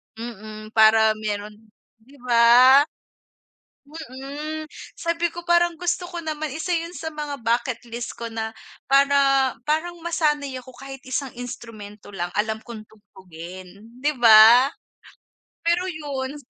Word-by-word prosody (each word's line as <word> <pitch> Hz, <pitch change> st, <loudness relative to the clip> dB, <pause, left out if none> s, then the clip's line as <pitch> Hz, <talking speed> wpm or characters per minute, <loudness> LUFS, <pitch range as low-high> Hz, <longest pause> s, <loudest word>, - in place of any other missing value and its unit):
Mm, 215 Hz, -1 st, -9 dB
para 220 Hz, 0 st, +5 dB
meron 210 Hz, -1 st, -4 dB, 0.5 s
di 255 Hz, +6 st, -21 dB
ba? 250 Hz, +3 st, +6 dB, 1.0 s
Mm. 300 Hz, +1 st, -8 dB, 0.3 s
Sabi 335 Hz, 0 st, -1 dB
ko 345 Hz, -, -8 dB
parang 345 Hz, 0 st, +2 dB
gusto 355 Hz, +1 st, -2 dB
ko 345 Hz, -1 st, -6 dB
naman 310 Hz, -1 st, -3 dB
isa 320 Hz, +4 st, -4 dB
yun 335 Hz, 0 st, -2 dB
sa 320 Hz, -, -5 dB
mga 295 Hz, -3 st, -6 dB
bucket 235 Hz, +1 st, -1 dB
list 235 Hz, +1 st, -6 dB
ko 235 Hz, 0 st, -6 dB
na 220 Hz, 0 st, -4 dB, 0.3 s
para 275 Hz, -1 st, +3 dB, 0.2 s
parang 340 Hz, +3 st, -1 dB
masanay 295 Hz, -5 st, -1 dB
ako 255 Hz, -, -14 dB
kahit 270 Hz, 0 st, -10 dB
isang 260 Hz, +1 st, -4 dB
instrumento 225 Hz, -5 st, -10 dB
lang 175 Hz, -1 st, -4 dB
alam 220 Hz, +1 st, -1 dB
kong 220 Hz, -2 st, -10 dB
tugtugin, 185 Hz, -3 st, -12 dB, 0.3 s
di 295 Hz, +2 st, 0 dB
ba? 235 Hz, +2 st, +7 dB, 0.9 s
Pero 345 Hz, +2 st, +1 dB
yun. 290 Hz, -5 st, -5 dB
260 Hz, 125 wpm, -23 LUFS, 220-310 Hz, 1.0 s, ba